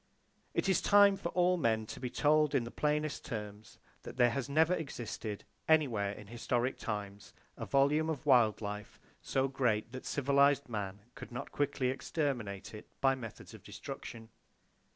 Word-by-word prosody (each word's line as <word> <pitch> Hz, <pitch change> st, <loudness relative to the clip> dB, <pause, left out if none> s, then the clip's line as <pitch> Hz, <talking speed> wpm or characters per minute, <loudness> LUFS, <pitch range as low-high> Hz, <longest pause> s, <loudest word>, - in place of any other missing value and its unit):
It -, -, +1 dB
is 190 Hz, -, +3 dB
time 205 Hz, -1 st, +6 dB
for 190 Hz, -3 st, -4 dB
all 180 Hz, 0 st, +3 dB
men 110 Hz, -7 st, +1 dB
to -, -, -8 dB
be 125 Hz, -, -3 dB
told 150 Hz, +4 st, +3 dB
in 120 Hz, -, +2 dB
the 115 Hz, -, -7 dB
plainest 150 Hz, 0 st, -1 dB
terms 105 Hz, -2 st, -7 dB, 0.2 s
that -, -, -10 dB
there 120 Hz, -1 st, +4 dB
never 160 Hz, +4 st, +4 dB
has 175 Hz, -, -1 dB
existed, 115 Hz, -6 st, -6 dB, 0.2 s
anywhere 125 Hz, -11 st, +3 dB
in 105 Hz, +1 st, -10 dB
historic 120 Hz, +3 st, -1 dB
times, 105 Hz, -2 st, -5 dB, 0.2 s
a -, -, -6 dB
volume 145 Hz, +3 st, +3 dB
of 155 Hz, -2 st, -3 dB
wild 120 Hz, -7 st, +4 dB
life 105 Hz, 0 st, -6 dB, 0.2 s
so 135 Hz, 0 st, 0 dB
great 120 Hz, -5 st, 0 dB
that 130 Hz, 0 st, -7 dB
civilized 140 Hz, 0 st, +3 dB
man 100 Hz, -4 st, -4 dB
could -, -, -10 dB
not 120 Hz, +3 st, -6 dB
quickly 140 Hz, -3 st, 0 dB
exterminate 130 Hz, -, -3 dB
it 105 Hz, -, -10 dB
by 135 Hz, -, +4 dB
his 130 Hz, -, -7 dB
methods 115 Hz, -2 st, -9 dB
of -, -, -11 dB
[Page -, -, -12 dB
6] -, -, -6 dB
destruction. 115 Hz, -1 st, -8 dB
130 Hz, 175 wpm, -33 LUFS, 110-145 Hz, 0.2 s, time